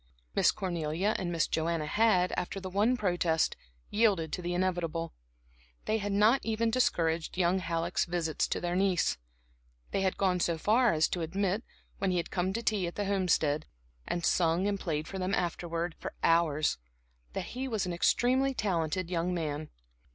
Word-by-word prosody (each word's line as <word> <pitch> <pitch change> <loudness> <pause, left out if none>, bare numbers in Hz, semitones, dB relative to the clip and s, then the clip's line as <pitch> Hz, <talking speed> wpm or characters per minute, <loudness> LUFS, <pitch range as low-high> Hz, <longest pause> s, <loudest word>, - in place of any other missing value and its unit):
Miss - - +4
Cornelia 175 +2 -1
and 175 -2 -2
Miss 165 -1 +2
Joanna 160 -1 -1
had, 185 0 +3
after 180 +2 -3
the 185 -1 -7
one 215 +6 +2
protest, 175 -6 +1 0.4
yielded 200 -8 +2
to - - -2
the 175 0 -2
inevitable; 175 -3 -1 0.7
they 220 +1 +1
had 205 0 -2
not 215 +6 +4
even 225 0 0
discouraged 165 -10 +1
young 185 +1 +2
Halleck's 170 0 -1
visits 170 -2 -1
to - - -2
their 175 0 -2
niece. 185 - +1 0.7
They 195 - 0
had 190 -1 0
gone 185 -2 +2
so 170 -1 +1
far 230 +8 +3
as 155 0 +3
to 175 - -2
admit, 195 +6 -1 0.4
when 195 - +1
he 180 - +1
had 170 - -2
come 185 +1 0
to 230 +3 -3
tea 205 -5 +1
at 170 - -6
the 205 - -2
Homestead, 180 -6 +1 0.4
and 175 -1 -1
sung 170 +1 +2
and 200 -1 -1
played 155 -3 -2
for 190 - -6
them 185 +1 0
afterwards 170 -1 -2
for - - -6
hours, 155 - +2 0.5
that - - -4
he 260 +2 -3
was 220 -7 -1
an 180 - -3
extremely 260 +9 +2
talented 180 -3 -1
young 175 +1 0
man. 155 -2 -3
180 Hz, 175 wpm, -30 LUFS, 165-200 Hz, 0.7 s, Miss